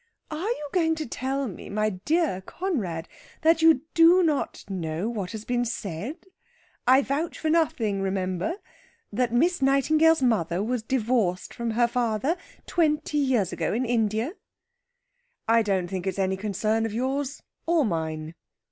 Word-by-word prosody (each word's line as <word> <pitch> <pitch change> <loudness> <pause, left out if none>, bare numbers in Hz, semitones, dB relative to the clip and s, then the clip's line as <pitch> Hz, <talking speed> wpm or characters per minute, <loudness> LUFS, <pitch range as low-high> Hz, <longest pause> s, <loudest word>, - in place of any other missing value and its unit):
"Are 325 +8 -2
you 300 -11 -3
going 325 -3 +2
to 315 -1 -4
tell 265 +3 -2
me, 195 - -8
my 215 +1 0
dear 275 - 0
Conrad, 195 - -3 0.4
that 325 0 +4
you 320 -5 +6
do 340 +2 +6
not 305 -4 -1
know 180 +3 -3
that 215 - -2
it - - -9
has 220 0 -6
been 245 -1 0
said 215 - -4 0.7
I 260 +2 +6
vouch 295 +6 -2
for 315 - -1
nothing, 225 -11 +1
remember 190 - -1 0.6
that 245 +2 +1
Miss 320 +8 +2
Nightingale's 305 +3 +4
mother 190 -6 +1
was 245 +1 -1
divorced 225 -6 0
from 235 -1 -3
her 240 -1 +4
father 240 - 0 0.3
twenty 300 -3 +1
years 250 -9 +1
ago - - -1
in 245 +4 0
India?" 225 - 0 1.1
"I 230 +1 +5
don't 195 -4 0
think 185 +1 -4
it's 190 - -2
any 190 -1 +1
concern 215 +3 0
of 215 - -7
yours 270 +3 -2 0.2
or 330 -4 +3
mine." 160 -4 -3
240 Hz, 155 wpm, -26 LUFS, 195-300 Hz, 1.1 s, you